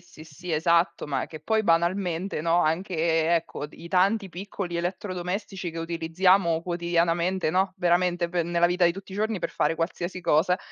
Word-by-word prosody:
sì, 155 - -15
sì, 170 +3 -9
esatto. 170 +1 +2
Ma 135 -3 -2
che 155 - -9
poi 220 +8 +1
banalmente, 175 0 0
no, 170 +2 +2
anche 175 +4 -1
e 165 +1 +2
ecco, 165 -3 -3
d 150 - -18
i 170 - -11
tanti 195 +3 +2
piccoli 180 -1 -5
elettrodomestici 185 +1 -4
che 165 - -7
utilizziamo 170 +1 +2
quotidianamente, 170 0 0
no, 185 +2 +1
veramente 175 -1 +1
pe 175 -1 0
nella 170 +1 +1
vita 175 0 +3
di 170 - +2
tutti 195 +1 -10
i - - -6
giorni 215 0 -1
per 170 - -3
fare 165 - 0
qualsiasi 175 +2 -3
cosa. 170 +3 +2
175 Hz, 180 wpm, -26 LUFS, 165-185 Hz, -, vita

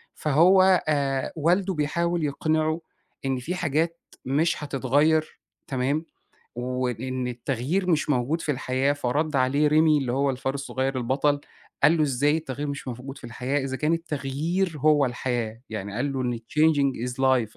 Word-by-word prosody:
فهو 180 +5 +5
آآ 140 -3 0
والده 180 +5 +1
بيحاول 170 +2 0
يقنعه 155 +2 0 0.4
إن 135 -1 0
في 165 +9 -4
حاجات 165 0 0 0.3
مش 150 +4 +1
هتتغيّر، 145 +3 +1 0.3
تمام، 140 +4 -1 0.5
وإن 125 +1 -2
التغيير 135 +9 -1
مش 155 -2 +1
موجود 145 +5 +1
في 150 - -1
الحياة، 130 +1 0
فرَد 145 +2 -1
عليه 140 +3 +3
ريمي 155 0 +4
اللي 130 -4 -2
هو 140 +2 +1
الفارس 135 +1 -3
الصغير 135 -1 -2
البطل 140 +4 +1 0.4
قال 165 - +6
له: 155 - +2
"إزاي 145 +1 +2
التغيير 145 -2 -4
مش 140 -1 -5
موجود 130 +3 -7
في - - -17
الحياة؟ 125 +4 -2
إذا 130 -1 -3
كان 150 +4 0
التغيير 165 +2 -2
هو 145 -1 +4
الحياة." 120 -2 -3
يعني 100 -2 -5
قال 135 +4 -1
له 135 -1 -2
إن 120 -2 -1
changing 140 -1 +1
is - - -4
life، 130 -4 +1
140 Hz, 155 wpm, -25 LUFS, 130-155 Hz, 0.5 s, قال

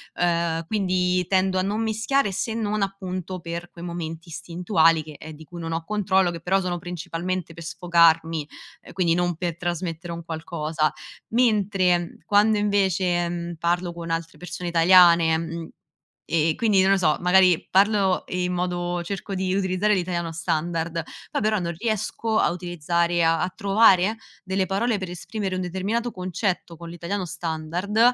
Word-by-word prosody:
Ehm, 170 -1 0
quindi 180 -2 0
tendo 190 0 +2
a - - +2
non 205 +4 -1
mischiare 220 +2 +1
se 220 +4 -2
non 215 -2 -1
appunto 185 -2 -4
per 170 +1 -6
quei 170 - -11
momenti 165 -1 -6
istintivi 165 -1 +2
che, 155 -1 -11
ehm, 160 - -9
di 155 +1 -12
cui 170 +2 -10
non 165 -1 -4
ho 165 0 -2
controllo, 190 -2 +1
che 170 - -6
però 190 +3 +1
sono 180 -1 -2
principalmente 175 0 -4
per 165 - -10
sfogarmi, 165 -3 +2 0.4
ehm, - - -13
quindi 175 -3 +2
non 175 0 0
per 170 0 -3
trasmettere 175 -1 -4
un 170 0 -7
qualcosa. 160 -1 -2 0.4
Mentre 200 -7 +2
quando 210 +1 +4
invece, 190 -4 +1
mhmm, 170 0 -4
parlo 175 +2 0
con 170 0 -7
altre 165 0 -3
persone 175 0 -6
italiane, 170 -1 +6
mhmm, 165 0 -5 0.6
e 165 -1 +1
e - - -4
quindi, 210 -4 +3
non 190 +1 +4
lo 195 - +5
so, 155 -5 +2
magari 180 -1 +4
parlo 195 -1 +3
in 180 0 -1
modo 175 -1 -2
cerco 195 +2 -5
di 185 0 -1
utilizzare 190 +2 +1
l'italiano 175 -2 -2
standard, 165 0 -2 0.3
poi - - -1
però 215 0 +1
non 170 -1 -3
riesco 220 +1 -1
a - - +3
utilizzare 175 0 -1
e 175 - +3
a 165 +2 +2
trovare 200 0 +4 0.3
delle 190 0 0
parole 220 +4 0
per 190 -2 -5
esprimere 190 +2 -4
un 185 - -2
determinato 200 +7 -2
concetto 185 -2 -3
con 170 0 -9
l'italiano 175 +3 -4
standard, 170 +5 -3
175 Hz, 165 wpm, -24 LUFS, 170-195 Hz, 0.6 s, italiane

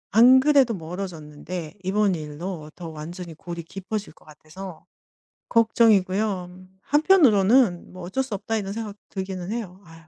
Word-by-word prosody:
안 250 +4 +8
그래도 270 -4 +4
멀어졌는데 165 -2 -6
이번 200 +1 +2
일로 155 +1 -6
더 170 -2 -7
완전히 165 +3 -8
골이 170 0 -7
깊어질 195 +3 -6
것 - - -24
같아서 155 +3 -11 0.6
걱정이고요. 210 -4 +3 0.3
한편으로는 250 - +4
'뭐 185 -1 -10
어쩔 190 +10 -1
수 260 -4 -7
없다.' 215 +3 -3
이런 195 -2 -4
생각도 210 -1 -5
들기는 190 -1 -5
해요. 200 -5 -5
아 165 -1 -16
190 Hz, 315 characters per minute, -24 LUFS, 170-220 Hz, 0.6 s, 안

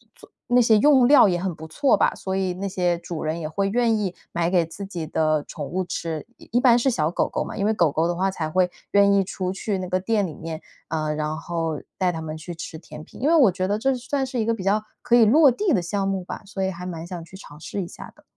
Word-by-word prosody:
做 - - -17 0.2
那 245 0 +4
些 225 -2 +5
用 265 +2 +5
料 285 -6 +7
也 175 -2 0
很 185 -2 -2
不 160 +1 -9
错 265 - +2
吧， - - +2
所 190 - -5
以 185 -2 0
那 195 +2 -4
些 180 -2 0
主 170 -2 -6
人 160 +2 -2
也 155 - -4
会 195 +4 -1
愿 230 +1 +2
意 195 -4 -2 0.2
买 170 0 0
给 175 -2 +2
自 195 +5 -8
己 175 -4 -5
的 155 -1 +1
宠 145 - -5
物 185 +1 -2
吃。 165 -3 -4
一 - - -16
一 245 - +3
般 245 -2 +6
是 265 - +2
小 160 -10 0
狗 - - 0
狗 - - -2
嘛， - - -7
因 200 - 0
为 220 - +2
狗 170 -7 +2
狗 160 +3 +1
的 175 - -1
话 190 +2 0
才 160 -4 -3
会 180 +2 +2 0.2
愿 200 0 +5
意 195 -1 +4
出 185 0 -3
去 195 +1 -2
那 185 - -5
个 185 +1 +1
店 205 +2 0
里 160 - -7
面， 160 -1 -6 0.3
呃， 155 -1 -2
然 155 0 -2
后 165 -2 -3 0.2
带 185 -2 +1
它 160 - -5
们 155 0 -5
去 170 +2 -8
吃 160 0 -7
甜 155 -1 -11
品。 - - -14
因 280 - +1
为 330 - +5
我 255 - +6
觉 185 +1 -2
得 205 - 0
这 265 +5 +1
算 265 +2 -2
是 255 -1 -4
一 220 - 0
个 230 - +1
比 225 - -5
较 205 +3 +1 0.2
可 240 - +3
以 235 - +7
落 280 +5 +6
地 375 - 0
的 180 - +2
项 195 +3 -2
目 190 -2 -1
吧， - - -7
所 195 -1 -4
以 190 - 0
还 180 +1 -8
蛮 170 -2 -6
想 175 -1 -6
去 190 - -14
尝 150 -6 -12
试 195 +4 -5
一 175 - -5
下 - - -11
的。 - - -23
185 Hz, 305 characters per minute, -23 LUFS, 165-215 Hz, 0.3 s, 料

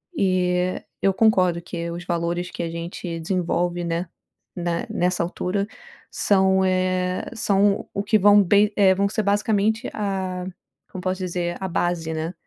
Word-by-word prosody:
E 185 -3 +1 0.2
eu 195 - +4
concordo 185 -5 +3
que 170 -1 -5
os 175 +1 -6
valores 175 +1 -2
que - - -5
a 165 - -2
gente 170 0 -5
desenvolve, 175 0 -1
né, 170 +1 -2 0.5
na 170 -1 -2
nessa 180 -1 0
altura 185 +3 -2 0.5
são, 190 -1 +3
eh, 185 0 0
são 200 -2 +2
o 200 - -3
que 210 +1 +3
vão 205 +1 +6
bem 205 +3 +4
eh, 195 -2 +5
vão 200 +1 +1
ser 215 0 -1
basicamente 210 +3 +1
a 190 -3 -3 0.5
como 185 - -6
posso 185 0 -2
dizer? 175 -1 -2
A 190 - -2
base, 170 -2 -1
né, 160 +3 -3
185 Hz, 155 wpm, -23 LUFS, 175-200 Hz, 0.5 s, vão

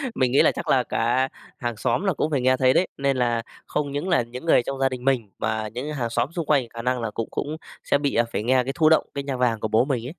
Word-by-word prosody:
Mình 125 -1 +1
nghĩ 135 - +5
là - - +5
chắc - - -6
là 130 -2 +3
cả 125 +4 0 0.3
hàng 120 -2 -3
xóm 120 - 0
là 190 -3 +1
cũng 155 +2 -1
phải 135 -4 +1
nghe 130 +1 +3
thấy 130 0 +4
đấy, 185 - +3
nên 140 -1 0
là 120 -2 +1 0.3
không 145 -2 -2
những 145 +7 -3
là 175 - +4
những 125 +6 -8
người 125 - +4
trong 135 +1 -5
gia 135 0 +3
đình 125 -1 -6
mình 125 -7 +1
mà 110 -1 -1
những 130 +8 -5
hàng 120 -5 -2
xóm 120 +4 0
xung 165 -3 -2
quanh 135 -6 +2
khả 115 +1 -7
năng 125 0 -1
là 110 -2 -3
cũng 115 +1 -3
cũng 155 +2 -3 0.3
sẽ - - +2
bị, 140 -1 -1
à, 120 - +4
phải 105 - -2
nghe 130 +1 +3
cái 135 +2 -3
thụ 155 -2 +4
động 160 - +4
cái 140 -1 -3
nhạc 135 -2 -3
vàng 120 -3 +1
của 110 - -2
bố 110 +4 +3
mình 125 -5 -2
ấy. - - -6
130 Hz, 300 wpm, -24 LUFS, 120-140 Hz, 0.3 s, nghĩ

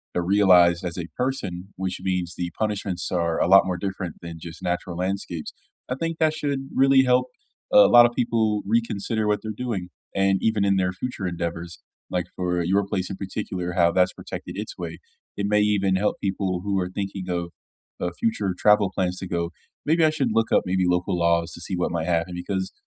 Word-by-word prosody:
uh, 90 - +2
realized 90 -2 +5
as 90 -1 -4
a 85 -2 -4
person- 100 -8 -3
which 95 -1 -3
means 90 -2 -1
the 90 -1 -3
punishments 100 -4 -2
are 85 -2 0
a - - +2
lot 95 +2 +7
more 90 -1 -2
different 95 -2 -4
than 85 -1 -8
just 80 +2 -9
natural 90 -1 -3
landscapes, 90 -3 -3 0.3
I 125 - -2
think 165 +3 -3
that 155 -1 +3
should 140 -3 -3
really 135 0 +5
help 125 0 +3 0.5
a 105 - +9
lot 120 0 +8
of 120 - +2
people 110 -3 +1
reconsider 110 0 0
what 105 0 +1
they're 110 - -4
doing. 105 -5 -4 0.2
And 95 0 +2
even 110 -3 +2
in 100 0 +3
their 90 -1 +1
future 105 +2 -5
endeavors- 85 -1 -4 0.3
like 90 -2 -1
for 90 -1 -1
your 95 +4 +2
place 95 -2 -2
in 95 - -4
particular- 95 -2 -4
how 85 -2 +4
that's 90 +1 +2
protected - - -8
its - - -5
way. - - -6 0.4
It 100 - -1
may 105 0 +3
even 100 -2 +2
help 105 +3 0
people 95 -2 -1
who 100 -1 0
are 90 - -2
thinking 95 -1 -5
of, 85 -1 -2 0.5
uh, 90 - -2
future 105 -4 0
travel 105 -1 +4
plans 90 -1 -1
to 95 - -5
go, 85 -1 -2 0.3
"Maybe 160 +2 +3
I 155 - +6
should 140 -6 0
look 115 0 +1
up, - - +4
maybe, 95 0 +1
local 90 +1 +1
laws 85 0 +1
to 85 - -9
see 95 - -3
what 90 - 0
might 85 -1 -2
happen." 85 +1 0
Because 95 +1 -3
95 Hz, 205 wpm, -24 LUFS, 90-105 Hz, 0.5 s, a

